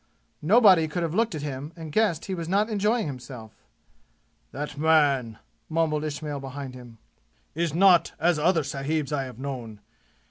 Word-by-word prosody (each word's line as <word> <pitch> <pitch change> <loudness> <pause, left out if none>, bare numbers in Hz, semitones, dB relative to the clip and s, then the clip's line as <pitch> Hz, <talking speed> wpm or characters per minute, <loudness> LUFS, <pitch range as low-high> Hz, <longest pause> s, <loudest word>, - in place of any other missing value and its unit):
Nobody 190 -2 +5
could 170 +3 -3
have 165 -1 -2
looked 220 -2 +1
at 150 - -5
him 145 +2 -5
and 160 -2 -8
guessed 185 -4 +1
he 195 - -4
was 170 -2 -4
not 205 +4 +2
enjoying 215 +3 +1
himself. 125 -5 -8 1.0
"That 145 +1 -5
man," 145 -7 +2 0.3
mumbled 155 -2 0
Ismail 150 -1 -4
behind 135 -1 -7
him, 120 -3 -12 0.6
"is 165 -1 -2
not 180 -1 +5
as 170 -1 +2
other 165 +1 +2
sahibs 145 +2 -2
I 135 -2 -1
have 125 -3 -10
known. 125 -6 -6
155 Hz, 155 wpm, -26 LUFS, 135-170 Hz, 1.0 s, Nobody